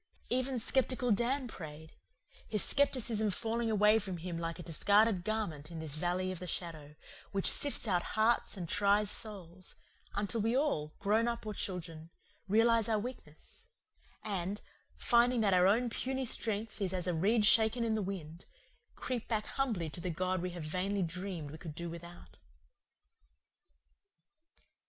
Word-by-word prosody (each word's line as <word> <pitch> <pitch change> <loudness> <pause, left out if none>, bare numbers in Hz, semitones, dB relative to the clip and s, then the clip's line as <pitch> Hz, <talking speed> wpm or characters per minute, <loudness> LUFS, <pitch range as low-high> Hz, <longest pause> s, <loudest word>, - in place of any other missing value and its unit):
Even 255 +1 +1
skeptical 250 +1 +1
Dan 250 +5 +1
prayed, 160 -6 -9 0.5
his 210 -2 +1
skepticism 235 -6 +1
falling 225 +3 -1
away 210 0 +5
from 190 -4 -4
him 170 +1 -5
like 165 0 -3
a 175 - -8
discarded 200 +4 +3
garment 180 -9 -3
in 170 - -8
this 160 -3 -5
valley 180 +4 -1
of 185 - -6
the 180 - -6
shadow, 155 -5 -5 0.4
which 195 -1 -1
sifts 285 -4 +2
out 180 -4 +2 0.2
hearts 220 -1 +2
and 175 -3 -4
tries 205 +3 +3
souls, 185 -4 -4 0.4
until 205 +2 -1
we 230 +4 +1
all, 155 - 0
grown 220 +3 +2
up 235 -1 -3
or 215 - -3
children, 165 -5 -4 0.4
realize 225 +2 +4
our 220 - +3
weakness, 235 - -9 0.6
and, 200 0 -3 0.4
finding 240 0 +3
that 200 -3 +3
our 180 0 +5
own 230 +5 +3
puny 260 +3 -2
strength 220 -2 -2
is 190 -2 0
as 180 -2 -1
a 180 - 0
reed 210 +7 +3
shaken 225 +2 +5
in 225 -1 +1
the 215 - 0
wind, 175 -4 -6 0.5
creep 245 -3 -4
back 215 -2 -1
humbly 225 -12 -1
to 155 +2 -8
the 180 - -2
God 185 +2 -1
we 180 - -2
have 175 -2 -7
vainly 185 +5 -1
dreamed 175 -3 -5
we 155 - -9
could 160 -3 -8
do 170 0 -5
without. 170 +1 -11
200 Hz, 160 wpm, -33 LUFS, 175-225 Hz, 0.6 s, away